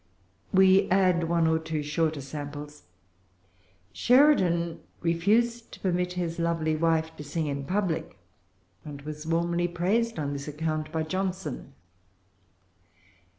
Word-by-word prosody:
We 190 Hz, 0 st, +5 dB
add 185 Hz, -3 st, +3 dB
one 170 Hz, -1 st, +2 dB
or 160 Hz, 0 st, +2 dB
two 160 Hz, -2 st, -3 dB
shorter 155 Hz, 0 st, -1 dB
samples. 145 Hz, 0 st, -8 dB, 1.1 s
Sheridan 185 Hz, -, +3 dB, 0.2 s
refused 220 Hz, +8 st, +1 dB
to -, -, -10 dB
permit 180 Hz, -1 st, 0 dB
his 175 Hz, -2 st, -3 dB
lovely 165 Hz, -2 st, 0 dB
wife 160 Hz, 0 st, +1 dB
to -, -, -7 dB
sing 155 Hz, +2 st, -2 dB
in 140 Hz, -1 st, -3 dB
public, 185 Hz, -1 st, -2 dB, 0.7 s
and 145 Hz, -2 st, -9 dB
was 150 Hz, +1 st, -7 dB
warmly 170 Hz, +1 st, +1 dB
praised 195 Hz, +7 st, 0 dB
on 145 Hz, -2 st, -2 dB
this 140 Hz, +1 st, -6 dB
account 155 Hz, +1 st, -3 dB
by 160 Hz, -1 st, -1 dB
Johnson. 180 Hz, -6 st, -4 dB
165 Hz, 120 wpm, -27 LUFS, 155-180 Hz, 1.1 s, We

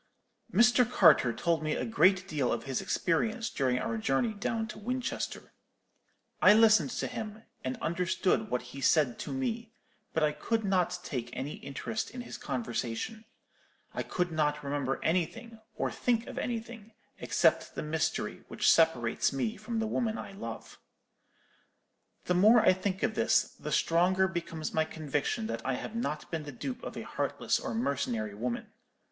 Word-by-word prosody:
"Mr. 240 Hz, +4 st, +5 dB
Carter 125 Hz, -, +6 dB
told 165 Hz, +5 st, 0 dB
me 155 Hz, 0 st, -1 dB
a -, -, -2 dB
great 190 Hz, -4 st, +3 dB
deal 145 Hz, -8 st, 0 dB
of -, -, -1 dB
his 135 Hz, -2 st, -2 dB
experience 220 Hz, +7 st, 0 dB
during 130 Hz, -3 st, +1 dB
our 115 Hz, -2 st, -2 dB
journey 135 Hz, -, +1 dB
down 220 Hz, +2 st, -2 dB
to 215 Hz, -, -8 dB
Winchester. 250 Hz, +4 st, -4 dB, 0.9 s
I 210 Hz, -, +8 dB
listened 220 Hz, +2 st, +6 dB
to -, -, -1 dB
him, 215 Hz, 0 st, -6 dB, 0.2 s
and 130 Hz, 0 st, -3 dB
understood 180 Hz, +5 st, +1 dB
what 125 Hz, -, -1 dB
he 135 Hz, -, -7 dB
said 135 Hz, -5 st, +3 dB
to -, -, -5 dB
me; 235 Hz, -4 st, -3 dB, 0.4 s
but 160 Hz, -, 0 dB
I 150 Hz, -, +3 dB
could 225 Hz, +7 st, -1 dB
not 180 Hz, -2 st, +1 dB
take 120 Hz, -7 st, -4 dB
any 140 Hz, +3 st, -4 dB
interest 180 Hz, +10 st, -4 dB
in 250 Hz, +1 st, -7 dB
his 245 Hz, -, -8 dB
conversation. 120 Hz, -, -3 dB, 0.7 s
I -, -, -2 dB
could 180 Hz, -1 st, -1 dB
not 150 Hz, -2 st, 0 dB
remember 140 Hz, -1 st, -1 dB
anything, 220 Hz, +7 st, -1 dB, 0.2 s
or -, -, -1 dB
think 235 Hz, -2 st, 0 dB
of -, -, -6 dB
anything, 230 Hz, -2 st, -5 dB, 0.3 s
except -, -, +2 dB
the -, -, -3 dB
mystery 155 Hz, +1 st, -2 dB
which -, -, +3 dB
separates 145 Hz, -9 st, +3 dB
me 145 Hz, -, -1 dB
from 235 Hz, -1 st, -5 dB
the 225 Hz, -, 0 dB
woman 220 Hz, 0 st, -1 dB
I -, -, -7 dB
love. 115 Hz, -, -8 dB, 1.5 s
"The 180 Hz, -, +1 dB
more 215 Hz, +6 st, +6 dB
I -, -, +6 dB
think 185 Hz, +1 st, -3 dB
of 220 Hz, -, +1 dB
this, 230 Hz, +2 st, +3 dB
the 150 Hz, -, -8 dB
stronger 180 Hz, +5 st, +3 dB
becomes 170 Hz, -3 st, -4 dB
my 160 Hz, -, +3 dB
conviction 150 Hz, -7 st, -2 dB
that 115 Hz, +1 st, -4 dB
I 135 Hz, -, 0 dB
have 215 Hz, -, -6 dB
not 155 Hz, -10 st, -3 dB
been 165 Hz, -2 st, -2 dB
the 150 Hz, -1 st, -7 dB
dupe 250 Hz, -, -5 dB
of -, -, -6 dB
a -, -, -4 dB
heartless -, -, -1 dB
or -, -, -4 dB
mercenary 125 Hz, -, -1 dB
woman. 120 Hz, +3 st, -4 dB
175 Hz, 165 wpm, -30 LUFS, 140-225 Hz, 1.5 s, I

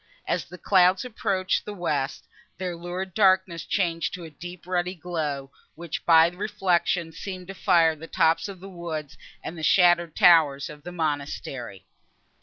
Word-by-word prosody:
As -, -, -1 dB
the 180 Hz, -, -11 dB
clouds 185 Hz, +2 st, +3 dB
approached 200 Hz, -6 st, -1 dB
the 210 Hz, -, -7 dB
west, 145 Hz, -7 st, -2 dB, 0.3 s
their 180 Hz, -2 st, -3 dB
lurid 175 Hz, +2 st, -5 dB
darkness 185 Hz, -4 st, +3 dB
changed 170 Hz, -4 st, -1 dB
to 180 Hz, -, -9 dB
a 160 Hz, -, -9 dB
deep 175 Hz, +3 st, -10 dB
ruddy 180 Hz, 0 st, -1 dB
glow, 150 Hz, -6 st, -4 dB, 0.2 s
which, 170 Hz, -1 st, -6 dB
by 165 Hz, -1 st, +7 dB
reflection, 175 Hz, -3 st, 0 dB
seemed 185 Hz, +2 st, -7 dB
to -, -, -5 dB
fire 170 Hz, -5 st, +3 dB
the 160 Hz, +2 st, -10 dB
tops 165 Hz, 0 st, +2 dB
of 195 Hz, -3 st, -9 dB
the 195 Hz, -, -9 dB
woods 160 Hz, -5 st, -6 dB, 0.3 s
and 170 Hz, -, -6 dB
the 160 Hz, -, -8 dB
shattered 175 Hz, 0 st, +4 dB
towers 150 Hz, -6 st, +5 dB
of 150 Hz, 0 st, -12 dB
the 180 Hz, -, -8 dB
monastery. 140 Hz, -, -4 dB
175 Hz, 160 wpm, -25 LUFS, 160-185 Hz, 0.3 s, by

